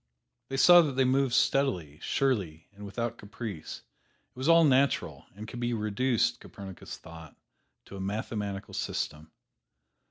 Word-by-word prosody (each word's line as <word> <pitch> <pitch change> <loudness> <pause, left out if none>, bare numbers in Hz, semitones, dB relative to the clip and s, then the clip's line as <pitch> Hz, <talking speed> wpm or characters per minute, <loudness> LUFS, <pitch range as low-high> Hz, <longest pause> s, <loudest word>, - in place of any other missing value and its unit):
They 135 - -3
saw 175 +5 +8
that 150 -5 -1
they 135 +1 +2
moved 130 -1 +2
steadily, 90 - +1
surely 95 - -1
and 100 +1 -12
without 115 +3 -4
caprice. 100 -6 -7 0.5
It - - -47
was 130 +5 -1
all 165 0 +7
natural, 140 -2 +2
and 105 +2 -8
could 120 - -7
be 120 0 -1
reduced, 115 +3 0
Copernicus 100 -4 -9
thought, 80 -2 -12 0.5
to 100 - -10
a - - -6
mathematical 100 0 -4
system. 75 -3 -4
110 Hz, 140 wpm, -29 LUFS, 95-130 Hz, 0.5 s, saw